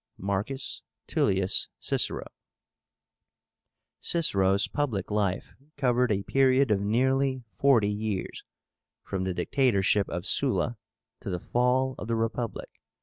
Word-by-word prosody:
MARCUS 100 +8 -3 0.2
TULLIUS 95 0 +1
CICERO. - - -1 1.7
CICERO'S 100 - +2
public 115 -10 -2
life 100 -3 -1 0.2
covered 125 -3 +2
a 100 -1 0
period 135 0 +3
of 100 -2 +2
nearly 130 +4 +1
forty 110 +1 +3
years, 105 -2 -4 0.6
from 95 -1 -3
the 95 -1 -2
dictatorship 100 -1 +2
of 90 +1 -4
Sulla 120 -1 +1 0.4
to - - -6
the 90 - -2
fall 125 +5 +1
of 105 - -6
the 115 - 0
Republic. 115 +1 -3
110 Hz, 110 wpm, -27 LUFS, 100-130 Hz, 1.7 s, period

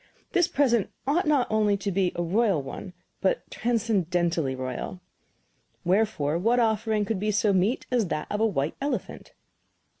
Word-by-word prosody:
This 355 -3 +3
present 240 -7 +2 0.2
ought 310 +6 +1
not 285 -5 +3
only 210 -2 +2
to 200 0 -3
be 185 -1 +1
a 175 - -1
royal 195 0 +2
one, 140 +7 -7 0.3
but - - +1
transcendently 180 - 0
royal. 130 +7 -5 0.9
Wherefore, 175 -5 +1
what 230 +6 +2
offering 220 -2 +1
could 205 -1 -2
be 210 +2 -1
so 210 0 +2
meet 195 +7 +1
as 240 -5 +2
that 155 -2 -2
of 210 - -1
a 225 - +4
white 145 -7 -1
elephant? 285 +1 -4
205 Hz, 155 wpm, -26 LUFS, 175-230 Hz, 0.9 s, a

